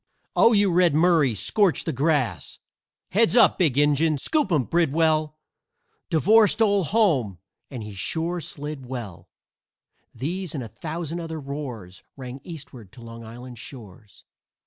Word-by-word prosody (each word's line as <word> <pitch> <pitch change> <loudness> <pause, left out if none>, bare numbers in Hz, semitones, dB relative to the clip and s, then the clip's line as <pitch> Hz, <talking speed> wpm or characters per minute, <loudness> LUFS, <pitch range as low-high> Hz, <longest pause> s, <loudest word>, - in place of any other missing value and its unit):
"Oh, 230 - +5
you 200 -2 +3
Red 175 -3 +3
Murray! 160 -7 +3
Scorch 185 - +2
the - - -3
grass!" 130 - -1 0.5
"Heads 225 +4 +3
up, - - +5
Big 150 -8 +2
Injun!" 145 +1 +3
"Scoop 295 - 0
'em, 150 -6 +2
Bridwell!" 155 0 +1 0.7
"Devore 210 +6 +5
stole 205 -3 +2
home! 145 - +1 0.3
And 120 -6 -7
sure 165 - -2
he - - -8
slid 145 -3 -7
well!" 120 -9 -8 0.9
These 165 +7 -4
and 135 - -4
a - - -7
thousand 160 - -5
other 165 -1 -6
roars 130 -11 -7 0.2
Rang 130 0 -8
Eastward 145 - -10
to 120 - -13
Long 115 0 -10
Island's 120 +1 -10
shores. 110 -5 -12
150 Hz, 140 wpm, -24 LUFS, 125-175 Hz, 0.9 s, Oh